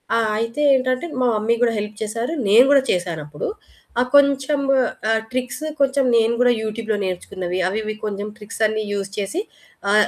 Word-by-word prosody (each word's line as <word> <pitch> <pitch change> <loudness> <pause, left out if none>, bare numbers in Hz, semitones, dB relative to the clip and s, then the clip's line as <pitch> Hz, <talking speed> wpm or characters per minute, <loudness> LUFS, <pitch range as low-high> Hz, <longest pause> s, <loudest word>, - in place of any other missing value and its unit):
ఆ! 230 - +3 0.2
అయితే 230 +5 -2
ఏంటంటే 255 +3 0 0.2
మా 250 - +3
మమ్మీ 220 +2 +1
గూడా 235 -2 +3
హెల్ప్ 210 +1 -5
చేసారు. 230 +7 -3
నేను 225 +6 +7
కూడా 275 -2 +5
చేశానప్పుడు 160 -5 -3 0.5
ఆ - - +4
కొంచము 280 0 +3 0.3
ఆహ్, 225 0 +2
ట్రిక్స్ 255 +3 -3 0.2
కొంచెం 275 0 +3
నేను 225 +1 +3
గూడా 245 -1 +5
యూట్యూబ్‌లో 220 0 -2
నేర్చుకున్నవి 180 0 -4
అవి 205 +3 -2
ఇవి 215 0 -4
కొంచెం 205 0 -3
ట్రిక్స్ 215 0 -9
అన్ని 215 0 -2
యూజ్ 200 -1 -3
చేసి 205 - -2 0.5
ఆహ్ 210 0 +5
225 Hz, 165 wpm, -21 LUFS, 205-255 Hz, 0.5 s, నేను